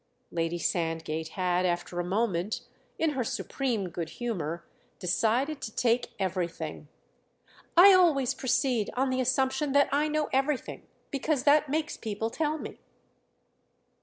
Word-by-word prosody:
Lady 165 0 -1
Sandgate 160 -2 -2
had 180 +1 0
after 175 0 -1
a - - 0
moment, 195 0 -1 0.4
in 320 -1 +1
her 265 -3 -1
supreme 230 -4 -2
good 170 -1 -5
humour, 170 -7 -4 0.3
decided 240 - 0
to 220 - -6
take 240 0 +1
everything. 170 -5 -3 0.9
"I 385 +3 +10
always 315 -9 +4
proceed 250 -4 0
on 265 +1 +2
the 260 0 +1
assumption 265 +2 +1
that 285 0 +4
I 290 +2 +2
know 305 0 0
everything, 270 0 -1 0.2
because 280 -1 0
that 295 0 +4
makes 310 +2 -1
people 220 +1 -3
tell 310 +2 -1
me." - - -8
235 Hz, 135 wpm, -28 LUFS, 175-280 Hz, 0.9 s, I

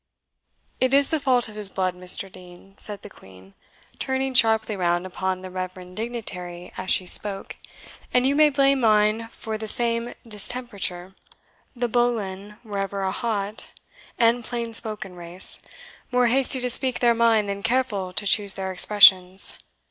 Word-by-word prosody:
"It 260 +1 +2
is 280 0 +3
the 320 - 0
fault 255 -4 +1
of 215 - -10
his 210 -2 -1
blood, 185 -1 -2
Mr. 180 +1 0
Dean," 180 +2 -15
said 205 -1 -2
the - - -8
Queen, 95 0 -17 0.5
turning 265 0 -2
sharply 220 -3 +3
round 175 -1 -1
upon 185 0 -4
the 185 - -8
reverend 185 0 -7
dignitary 185 -6 -6
as 185 0 -6
she 185 - +2
spoke; 195 +2 -3 0.5
"and 250 0 +2
you 275 +1 +2
may 305 0 +5
blame 275 -1 +2
mine 215 -1 +2
for 220 -1 -7
the 220 - -5
same 235 +1 0
distemperature. 205 -5 -2 0.6
The 245 0 -2
Boleyns 210 -4 -2
were 205 -3 -5
ever 195 0 -3
a 190 - -1
hot 210 -2 -3 0.5
and 235 +1 +2
plain 235 0 -4
spoken 215 -5 -1
race, 175 +1 0 0.5
more 250 0 +2
hasty 265 +1 +3
to 250 - -1
speak 260 +1 +5
their 240 -1 +3
mind 225 -2 +2
than 200 0 -4
careful 225 -6 -1
to 205 - -1
choose 200 -1 +2
their 190 -1 -4
expressions. 190 -1 +5
210 Hz, 160 wpm, -23 LUFS, 190-240 Hz, 0.6 s, may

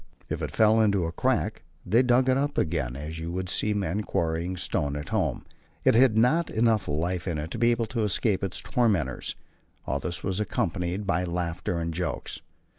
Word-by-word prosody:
If - - -3
it - - -2
fell 110 0 +4
into 100 -5 +2
a 80 - -2
crack, - - 0 0.2
they 115 +7 +4
dug 125 0 +3
it 130 - +4
up 145 +2 -1
again 75 -8 0
as 75 +4 -6
you 80 +1 -4
would 90 0 -3
see 105 - +1
men 100 0 -1
quarrying 85 -1 -1
stone 70 -4 -1
at 75 0 -5
home; - - -1 0.4
it - - +5
had 115 -1 +5
not 150 +9 +3
enough 110 -1 +2
life 85 +5 -1
in 85 -3 -1
it 75 +3 -5
to 120 - -4
be 120 +1 +4
able 115 -1 +1
to 115 0 -3
escape 105 0 +1
its 95 -2 -2
tormentors. 95 - 0 0.5
All 70 - -1
this 85 +5 -5
was 95 +1 -1
accompanied 90 -1 -1
by 90 -2 +1
laughter 85 0 -2
and 85 0 -2
jokes. 90 +2 -4
90 Hz, 195 wpm, -27 LUFS, 85-110 Hz, 0.5 s, it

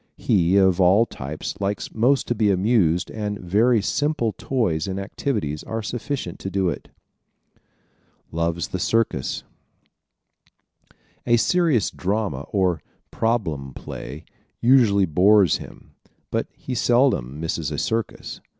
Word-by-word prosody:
He 90 0 +2
of 95 -1 +4
all 95 +6 +5
types 75 - -6
likes 100 +1 -2
most 130 +5 +2
to - - +1
be 105 -2 +2
amused 95 -3 +2
and 105 -2 -3
very 110 +5 +2
simple 140 -3 0
toys 100 - -1
and 95 0 -3
activities 100 - -3
are 110 0 -4
sufficient 120 -4 -4
to 95 - -4
do 95 -1 +1
it. 80 - -6 1.4
Loves 85 0 -1
the 95 - -3
Circus 115 - 0 1.5
¶ - - -26 0.3
A 120 0 +5
serious 155 - +2
drama 95 -8 -2
or 90 -5 +1 0.3
"problem 80 - -1
play" 75 +5 -8 0.3
usually 115 -6 +5
bores 95 +2 +4
him - - -12 0.4
but - - -1
he 130 - -6
seldom 120 - +2
misses 80 -2 -2
a - - -4
circus. 115 -3 -3
100 Hz, 125 wpm, -23 LUFS, 85-115 Hz, 1.5 s, all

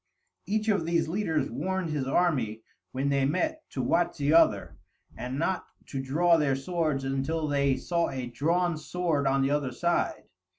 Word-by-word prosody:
Each 215 +2 0
of 200 -5 +2
these 165 -1 +1
leaders 160 - -1
warned 175 +6 -2
his 140 -3 -2
army, 130 -9 +1 0.3
when 135 +2 -1
they 140 -1 +2
met, 310 - 0
to 130 - -3
watch 170 +8 +1
the 145 +1 +1
other, 110 - +3 0.4
and 125 +2 -5
not 180 +4 -1 0.2
to 135 - -3
draw 165 +6 +3
their 145 -4 +2
swords 155 -1 -1
until 135 +4 -1
they 140 -2 +2
saw 170 +5 0
a 130 -2 -4
drawn 165 +8 0
sword 155 -3 -1
on 135 0 +2
the 135 - +1
other 145 -3 0
side. 170 -6 0
150 Hz, 170 wpm, -28 LUFS, 135-170 Hz, 0.4 s, other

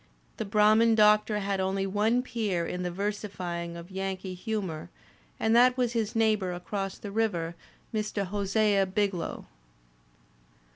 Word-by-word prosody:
The - - -3
Brah 210 +1 +4
man 225 0 +4
Doctor 210 0 +4
had 195 0 -1
only 190 +1 0
one 215 +5 +1
peer 215 -9 -1
in 180 +2 -4
the 180 - -1
versifying 180 -3 -4
of 170 +2 -10
Yankee 190 0 -4
humour 185 - -4 0.5
and 220 +1 +2
that 250 +1 +6
was 245 -2 +1
his 225 -2 -1
neighbour 215 -5 +2
across 195 +2 -4
the 205 - -7
river, 190 -7 0 0.4
Mr. 210 -2 -1
Hosea 200 0 +1
Biglow. 195 -3 -2
200 Hz, 140 wpm, -28 LUFS, 185-215 Hz, 0.5 s, that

